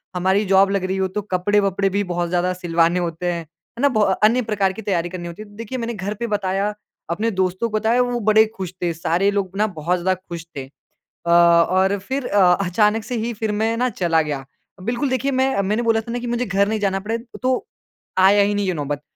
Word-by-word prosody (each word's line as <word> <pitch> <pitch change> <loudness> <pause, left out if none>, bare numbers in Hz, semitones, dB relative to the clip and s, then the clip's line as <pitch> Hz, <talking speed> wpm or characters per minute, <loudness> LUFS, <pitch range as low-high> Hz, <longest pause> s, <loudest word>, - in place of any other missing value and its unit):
हमारी 190 +3 +2
जॉब 195 +1 +4
लग 200 -2 0
रही 190 +1 -1
हो 190 0 +1
तो 205 +3 -4
कपड़े-वपड़े 195 +1 +1
भी 200 +2 0
बहुत 175 -2 -2
ज़्यादा 180 +1 +1
सिलवाने 170 -1 +1
होते 170 0 -3
हैं, 170 - -4
है 165 - -14
ना? 285 - +5
बो 220 -5 0
अ, 195 -2 +3
अन्य 235 +4 +5
प्रकार 200 -3 0
की 220 - -8
तैयारी 175 -4 -1
करनी 175 -1 -6
होती 170 +4 -8
है 215 - -9
तो 205 - -17
देखिए, 230 +3 -5
मैंने 235 -1 -3
घर 200 0 -4
पे 235 - -1
बताया 200 0 -1 0.4
अपने 215 +7 -1
दोस्तों 185 +4 -1
को 215 - -1
बताया 225 +3 +2
वो 245 -1 -1
बड़े 215 0 +5
खुश 185 -1 -5
थे 170 -1 0
सारे 170 +4 +1
लोग 200 -2 -1
ना 215 +1 +2
बहुत 175 0 -2
ज़्यादा 185 +2 +1
खुश 170 -2 -7
थे। 135 - -4
अ, 135 - -27 0.4
और 175 +3 +4
फिर 260 +6 -4
अ, 185 -3 +4
अचानक 210 +4 +2
से 245 +3 -4
ही 230 +2 -2
फिर 220 0 -2
मैं 220 +2 0
ना 250 +1 +1
चला 170 -7 +1
गया। 145 -3 -4 0.4
बिल्कुल 240 +7 -1
देखिए, 260 +2 0
मैं 260 -5 +1
मैंने 210 +5 0
बोला 225 -1 +2
था 230 +1 -8
ना 245 - -2
कि 245 - -5
मुझे 240 +1 -1
घर 200 +1 +1
नहीं 220 0 -1
जाना 195 -1 0
पड़े 225 +3 -2 0.3
तो 255 -1 +1 0.5
आया 200 +2 +6
ही 205 - +1
नहीं 200 -1 0
ये 185 - +1
नौबत। 145 -1 -3
200 Hz, 240 wpm, -21 LUFS, 180-220 Hz, 0.5 s, आया